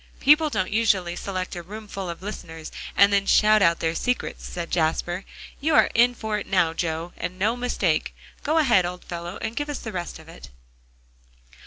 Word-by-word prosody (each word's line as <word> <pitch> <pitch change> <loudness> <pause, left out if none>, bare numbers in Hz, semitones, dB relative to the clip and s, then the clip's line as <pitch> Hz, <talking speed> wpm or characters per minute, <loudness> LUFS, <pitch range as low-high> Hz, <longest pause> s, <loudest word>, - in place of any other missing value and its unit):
"People 300 +2 +5
don't 185 -9 -1
usually 200 -5 +2
select 185 0 -4
a 175 - -5
roomful 195 0 -7
of 170 +2 -7
listeners, 160 -6 -7 0.3
and 200 0 +6
then 200 0 +2
shout 215 0 +5
out 170 -3 +3
their 160 0 0
secrets," 250 +8 -2
said 170 -1 -6
Jasper. 175 +2 0 0.3
"You 310 +2 +1
are - - +5
in 245 +1 +4
for 220 -2 -2
it - - -8
now, 175 -4 +2
Joe, 165 +1 -3
and 180 +1 -5
no 215 +5 +1
mistake. 225 -10 -1 0.3
Go 310 +2 0
ahead, 245 - +4
old 180 +1 -5
fellow, 175 +2 -6
and 225 - -3
give 290 0 -3
us 290 - -3
the 220 - -6
rest 175 -3 -5
of - - -15
it." - - -12
190 Hz, 190 wpm, -24 LUFS, 175-220 Hz, 0.3 s, and